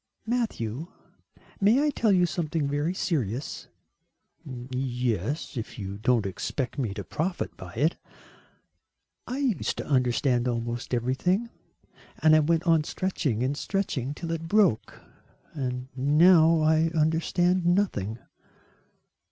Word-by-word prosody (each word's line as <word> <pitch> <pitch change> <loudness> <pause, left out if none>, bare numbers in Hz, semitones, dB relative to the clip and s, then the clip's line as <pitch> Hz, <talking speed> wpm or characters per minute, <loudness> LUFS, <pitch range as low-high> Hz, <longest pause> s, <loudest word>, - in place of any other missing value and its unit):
"Matthew, 170 - -2 0.7
may 225 +8 +4
I 300 - +2
tell 230 -5 +1
you 180 -2 +4
something 160 -2 -2
very 145 +5 -1
serious?" 135 - -2 0.8
"Yes, 125 - -3
if 115 +1 -5
you 100 -1 -6
don't 120 -1 +2
expect 125 +8 -3
me 120 -7 -1
to - - -5
profit 175 +3 -3
by 90 -2 -10
it." 150 +8 +1 1.3
"I 250 - -3
used 265 -8 -1
to - - -4
understand 125 -2 +1
almost 120 +1 -2
everything, 180 - 0 0.7
and 155 0 +5
I - - +6
went 165 +2 +2
on 165 -3 +3
stretching 150 - -2
and 135 +3 0
stretching 145 -7 -2
till 165 +1 -5
it 165 0 -3
broke, 200 - +2 0.5
and 125 -3 -3
now 160 +4 +5
I 160 +1 +3
understand 170 +3 +2
nothing." 175 - +1
150 Hz, 120 wpm, -27 LUFS, 125-175 Hz, 1.3 s, I